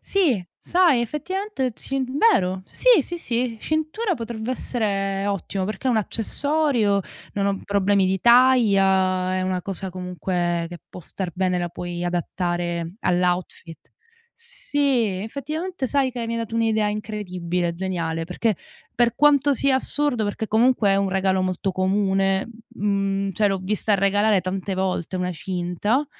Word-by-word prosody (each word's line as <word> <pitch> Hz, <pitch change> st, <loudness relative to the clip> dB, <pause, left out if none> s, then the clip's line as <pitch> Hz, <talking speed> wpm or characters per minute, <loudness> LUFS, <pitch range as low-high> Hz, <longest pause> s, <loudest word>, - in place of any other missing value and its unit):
Sì, 295 Hz, -, +1 dB
sai 345 Hz, -8 st, +3 dB
effettivamente, 300 Hz, -, -3 dB
ci 270 Hz, +3 st, -2 dB
vero, 250 Hz, -, +2 dB
sì, -, -, +5 dB
sì, 345 Hz, -, -4 dB
sì, 240 Hz, -5 st, -1 dB
cintura 315 Hz, +6 st, -1 dB
potrebbe 230 Hz, -1 st, -5 dB
essere 195 Hz, -6 st, -1 dB
ottimo 195 Hz, -1 st, -2 dB
perché 210 Hz, +5 st, -4 dB
è -, -, +4 dB
un 235 Hz, -, +2 dB
accessorio, 230 Hz, 0 st, +1 dB, 0.3 s
non 200 Hz, -1 st, 0 dB
ho 200 Hz, -1 st, 0 dB
problemi 200 Hz, -1 st, +2 dB
di 190 Hz, 0 st, 0 dB
taglia, 195 Hz, -7 st, +4 dB
è 185 Hz, -, 0 dB
una 185 Hz, -1 st, -1 dB
cosa 195 Hz, 0 st, -5 dB
comunque 180 Hz, -1 st, -2 dB
che 175 Hz, 0 st, -9 dB
può -, -, -10 dB
star 180 Hz, +2 st, -4 dB
bene, 185 Hz, -1 st, 0 dB
la 175 Hz, 0 st, -2 dB
puoi 175 Hz, 0 st, -5 dB
adattare 175 Hz, -1 st, -2 dB
all'outfit. 180 Hz, -2 st, -1 dB, 0.6 s
Sì, 275 Hz, -, 0 dB
effettivamente 305 Hz, -, -4 dB
sai 270 Hz, 0 st, +1 dB
che 240 Hz, -1 st, -4 dB
mi 230 Hz, -, -2 dB
hai -, -, -2 dB
dato 225 Hz, 0 st, -5 dB
un'idea 220 Hz, -2 st, +2 dB
incredibile, 180 Hz, -5 st, -3 dB
geniale, 170 Hz, -3 st, -2 dB
perché 205 Hz, +6 st, 0 dB, 0.4 s
per 240 Hz, -1 st, +2 dB
quanto 290 Hz, -1 st, +4 dB
sia 270 Hz, +1 st, +2 dB
assurdo 265 Hz, -3 st, 0 dB
perché 210 Hz, +2 st, -3 dB
comunque 225 Hz, -1 st, +3 dB
è 195 Hz, -, +4 dB
un 195 Hz, 0 st, +1 dB
regalo 190 Hz, 0 st, +1 dB
molto 185 Hz, +1 st, -1 dB
comune, 195 Hz, 0 st, +1 dB, 0.2 s
mhmm, 195 Hz, -1 st, -1 dB
cioè 210 Hz, +4 st, +2 dB
l'ho 195 Hz, -, 0 dB
vista 210 Hz, +2 st, +1 dB
regalare 200 Hz, +1 st, +3 dB
tante 190 Hz, +1 st, -3 dB
volte 185 Hz, -1 st, -2 dB
una 180 Hz, 0 st, -2 dB
cinta, 185 Hz, -, -1 dB
200 Hz, 145 wpm, -23 LUFS, 185-245 Hz, 0.6 s, sì